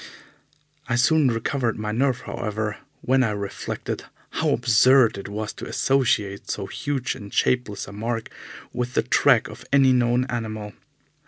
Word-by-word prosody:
I 120 - +2
soon 145 +4 +4
recovered 115 +1 -1
my 105 0 -3
nerve, 130 +2 +1
however, 110 -3 -3 0.2
when 130 +1 +2
I 125 - +2
reflected 100 -1 -5 0.3
how - - 0
absurd 120 +1 +5
it 100 0 -7
was 105 +1 -4
to - - -8
associate 115 -5 0
so 100 - -2
huge 140 +3 -3
and 100 -1 -10
shapeless 110 -6 0
a - - -9
mark 115 +2 -4 0.4
with 125 0 -3
the - - +3
track 125 0 +4
of - - -11
any 135 -2 +5
known 125 0 +2
animal. 110 -4 -4
120 Hz, 150 wpm, -24 LUFS, 105-130 Hz, 0.4 s, absurd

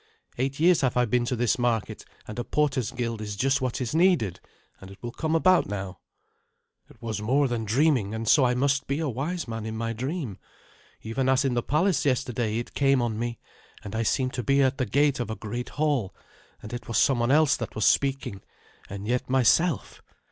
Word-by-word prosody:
Eight 135 +2 -1
years 170 0 +4
have 130 -2 0
I 125 - +4
been 120 +1 +1
to 125 - -1
this 120 0 +1
market, 120 -3 -1 0.2
and 105 +3 -6
a - - -1
porters' 135 -6 0
guild 115 -3 -4
is 105 -1 -5
just 135 +4 +1
what 130 -2 -2
is 125 -3 -3
needed. 160 - +2 0.4
And 95 - -12
it 100 - -12
will 120 - -4
come 160 +5 -2
about 185 +2 +4
now." 95 -2 -5 0.9
"It - - -19
was 110 -2 -3
more 135 +6 +2
dreaming, 120 -1 +1
and 110 0 -4
so 140 +5 +5
I 125 -1 +2
must 135 +1 +1
be 140 - -1
a 160 -1 -1
wise 145 +7 -3
man 115 -1 -5
in 110 0 -5
my 115 0 -2
dream. 130 - -4 0.6
Even 130 +4 -1
as 135 +1 +3
in 130 - +1
the 120 - +1
palace 155 +3 +1
yesterday 125 -5 0
it 120 - -5
came 135 -1 +3
on 115 -3 -1
me, 120 0 -3 0.5
and 100 - -8
I 115 - 0
seemed 130 +3 0
to 125 - -3
be 140 +2 +3
at 135 +1 0
the 130 - 0
gate 140 +4 +2
of 120 - -3
a 110 - -3
great 120 +3 -5
hall, 145 -10 -1 0.5
and 105 - -8
it 120 - -6
was 115 - -1
someone 120 -3 +3
else 150 0 +4
that 115 - -6
was 110 - 0
speaking, 135 -8 +1 0.5
and 100 +1 -6
yet 125 +2 -1
myself. 135 - +2
125 Hz, 210 wpm, -26 LUFS, 115-140 Hz, 0.9 s, so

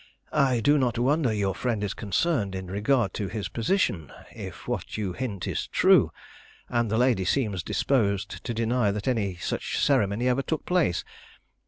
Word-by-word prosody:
"I 135 -5 +3
do 145 +5 +4
not 125 -3 0
wonder 135 +1 +2
your 100 -3 0
friend 115 -2 -2
is 100 - -2
concerned 105 - 0
in 95 0 -5
regard 105 +3 +1
to 100 - -3
his 105 0 -4
position, 110 - 0 0.2
if - - -8
what - - -3
you 100 -4 -2
hint 100 -6 -4
is - - -2
true, - - +4 0.6
and 120 -2 +1
the 110 - +1
lady 120 -6 +3
seems 105 -2 0
disposed 100 0 0
to - - -3
deny 115 0 +1
that 105 +3 -3
any 105 -7 0
such - - -3
ceremony 105 +4 +2
ever 125 +2 +2
took 155 +3 -3
place. 175 - +1
110 Hz, 170 wpm, -26 LUFS, 100-130 Hz, 0.6 s, do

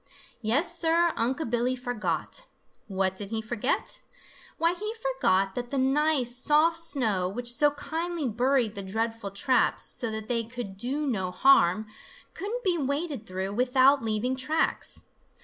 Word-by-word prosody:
Yes, 300 +10 0
Sir, 335 +1 +3
Unc' 260 +6 -1
Billy 245 +1 +1
forgot! 245 - -3 0.4
What 190 -2 0
did 200 0 -5
he 225 0 -2
forget? 220 +3 -2 0.6
Why, 335 +1 +2
he 425 +5 -5
forgot 450 - +1
that 245 +2 -4
that 275 - -2
nice, 270 -2 +2
soft 305 +5 +3
snow, 225 - 0
which 240 +4 -2
so 295 +4 +4
kindly 325 +1 -3
buried 245 0 +1
the 200 - -4
dreadful 225 +2 -3
traps 225 +6 +1
so 235 - -1
that 220 0 -5
they 230 -1 0
could 230 -4 -7
do 265 +9 -2
no 195 -9 -1
harm, 185 -2 +4 0.5
couldn't 460 +5 -4
be 360 -4 +1
waded 280 -3 -2
through 190 +2 -3
without 260 +4 +4
leaving 225 +4 -1
tracks. 305 +5 -1
250 Hz, 150 wpm, -27 LUFS, 215-300 Hz, 0.6 s, so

